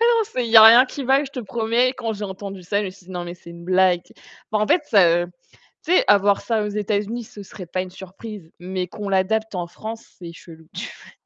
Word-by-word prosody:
Ah 465 - +3
non, 460 -1 +3
c'est 255 - -3
il - - -6
y - - +8
a 220 - +11
rien 235 +4 +8
qui 270 +1 -7
va, 270 +3 +3
je 275 - -9
te 255 - -5
promets. 235 +3 0
Quand 225 -1 -3
j'ai 205 0 -6
entendu 195 -1 -7
ça, 200 +3 0
je 205 - -3
me 185 - -5
suis 185 -1 -19
dit: 185 - -11
«Non, 175 -1 -4
mais 175 0 -7
c'est 170 - -14
une 170 0 -11
blague», 185 -1 +3
tu - - -21
sais. - - -22 0.3
Bah 215 - +2
en 215 - +1
fait, 340 - +3
heu, 175 -2 +5 0.6
tu 350 - +1
sais, - - +5
avoir 200 0 +4
ça 225 -3 -1
aux - - -2
États-Unis, 210 +3 -2
ce 205 -1 -11
serait 185 -1 -10
pas 185 +2 -2
une 185 -1 -8
surprise 190 -1 -10
mais 180 0 -4
qu'on 205 +2 -7
l'adapte 210 +2 0
en 175 -1 -3
France, 220 +5 -8
c'est 170 -1 -9
chelou. 160 -2 -15
Tu - - -4
vois? - - -15
200 Hz, 270 wpm, -22 LUFS, 185-225 Hz, 0.6 s, a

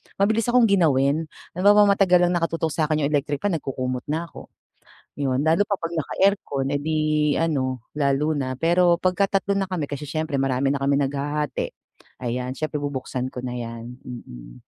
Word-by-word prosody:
mabilis 215 +3 +1
akong 245 0 +4
ginawin, 155 -4 +3 0.2
halimbawa 205 +4 +5
matagal 180 -3 +4
lang 175 - +3
nakatutok 165 -2 0
sakin 155 -1 0
yung 140 - 0
electric 145 +1 -1
fan, 185 -6 +1
nagkukumot 130 -2 -4
na 160 +3 -1
ko. - - -11 0.7
Yun, 135 -2 0
lalo 165 +6 +3
pa 205 - -1
pag 165 -3 -5
naka-aircon, 155 -5 0
eh 145 - +1
di 155 +2 -1 0.4
ano 130 -7 0 0.2
lalo 145 +1 +1
na. 130 -2 -2
Pero 170 +4 +3
pagka 185 +2 +2 0.2
tatlo 200 0 -1
na 195 - 0
kami 180 -6 -3
kasi 145 +1 -5
siyempre 155 -1 -2
marami 135 0 +1
na 140 - +1
kaming 140 +1 +2
naghahati, 145 +1 -3 0.5
ayan 125 +1 -2
siyempre 155 +2 -3
bubuksan 135 -3 -3
ko 125 - -5
na 125 -1 -4
yan, 115 +1 -7
mm. - - -10
145 Hz, 170 wpm, -23 LUFS, 135-170 Hz, 0.7 s, halimbawa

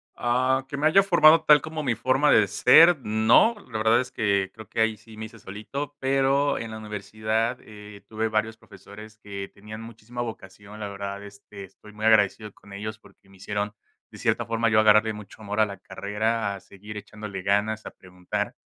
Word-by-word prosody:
Ah, 130 +2 +1
que 140 - -5
me 145 - -1
haya 155 +5 +6
formado 165 -4 +5
tal 150 -1 +7
como 155 +2 -6
mi 130 -6 -1
forma 130 +6 +2
de 110 - +5
ser, 165 - +6
no, 110 - +4 0.2
la 110 - -3
verdad 110 +2 +4
es 125 0 -4
que 100 -4 0
creo 110 -2 -13
que - - -5
ahí 110 0 +2
sí 110 +1 -16
me 110 - -6
hice 115 +1 -13
solito, 135 +10 -7
pero 135 +1 +1
en 115 - -6
la 110 - -7
universidad, 110 +3 -3
eh, 105 -1 -13
tuve 110 0 -2
varios 110 +1 -1
profesores 105 0 -14
que 100 -2 -8
tenían 105 +2 -10
muchísima 115 +1 -8
vocación, 105 -2 -9
la 105 - -4
verdad, 100 0 -6
este, 100 0 -12
estoy 95 +2 -15
muy 105 +1 -5
agradecido 105 -1 +3
con 100 0 -16
ellos 110 +2 -6
porque - - -22
me 95 -1 -19
hicieron, 105 +2 -4 0.4
de - - -13
cierta - - 0
forma, 115 0 0
yo 110 -1 +4
agarrarle 110 0 +4
mucho 105 0 -12
amor 105 0 -4
a 110 - +5
la 100 -2 -9
carrera, 105 +1 -2
a 100 - -8
seguir 100 +2 -12
echándole 105 -2 -8
ganas, 105 +3 0
a - - -8
preguntar, 90 -1 -5
110 Hz, 200 wpm, -25 LUFS, 105-115 Hz, 0.4 s, tal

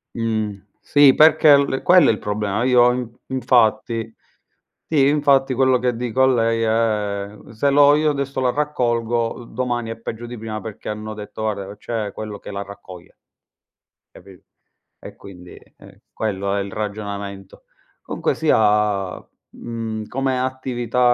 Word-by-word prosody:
Mh. 110 -4 -2 0.2
Sì, 145 -2 +5
perché 155 -1 +6
l 140 -1 -1
quello 180 0 +6
è - - +6
il 110 - -3
problema. 105 +1 -2
Io 125 -1 +5
in 125 -2 -3 0.2
infatti 115 -3 +1 0.7
sì, 140 -4 +3
infatti 140 -2 +3
quello 130 0 +3
che 125 -1 -1
dico 125 +2 0
a - - +7
lei 115 -2 +1
è: 105 -2 -2
"Se 140 +6 +1
lo 145 +1 +6
io 155 0 +2
adesso 140 -1 -3
la 125 - +2
raccolgo, 120 -5 -1
domani 120 -1 -3
è 115 - -7
peggio 115 +1 -7
di 120 0 -8
prima", 110 0 -5
perché 110 -2 -8
hanno 110 0 -5
detto: 105 +1 -9
"Guarda, 100 -2 -4
c'è 110 -2 -4
quello 105 -2 -7
che - - -11
la 100 0 -4
raccoglie" 95 -3 -13 1.0
capì. 95 -2 -15 0.6
E - - -11
quindi, 90 -2 -13 0.2
ehm, - - -17
quello 100 -2 -2
è 100 - 0
il 100 - -6
ragionamento. 100 -2 -6 0.4
Comunque - - -2
sia, 105 -3 +1 0.3
mhmm, 110 -2 -6
come 135 -1 -1
attività, 130 -2 -3
115 Hz, 150 wpm, -21 LUFS, 105-130 Hz, 1.0 s, a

